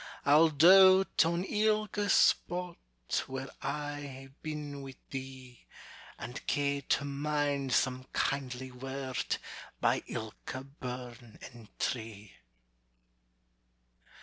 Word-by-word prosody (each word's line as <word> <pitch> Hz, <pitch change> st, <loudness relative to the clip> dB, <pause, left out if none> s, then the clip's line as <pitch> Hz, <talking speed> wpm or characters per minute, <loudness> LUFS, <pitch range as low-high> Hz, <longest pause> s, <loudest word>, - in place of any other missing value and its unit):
I'll 155 Hz, +3 st, +6 dB
doat 185 Hz, +5 st, +7 dB
on 170 Hz, +1 st, 0 dB
ilka 210 Hz, 0 st, 0 dB
spot 180 Hz, 0 st, +2 dB, 0.5 s
Where 135 Hz, 0 st, -5 dB
I 145 Hz, -1 st, -3 dB
ha'e 135 Hz, -1 st, -9 dB
been 150 Hz, -2 st, -5 dB
wi' 135 Hz, -1 st, -9 dB, 0.2 s
thee; 130 Hz, -2 st, -8 dB, 0.5 s
And 120 Hz, -, -7 dB
ca' 140 Hz, -1 st, +1 dB, 0.2 s
to 140 Hz, -, -6 dB
mind 145 Hz, -1 st, -1 dB
some 130 Hz, 0 st, +1 dB
kindly 130 Hz, -2 st, -2 dB
word 130 Hz, +1 st, -3 dB, 0.4 s
By -, -, +2 dB
ilka 110 Hz, +4 st, -6 dB
burn 125 Hz, -4 st, -8 dB
and 115 Hz, -2 st, -11 dB
tree. 110 Hz, -4 st, -4 dB
140 Hz, 95 wpm, -31 LUFS, 130-150 Hz, 0.5 s, doat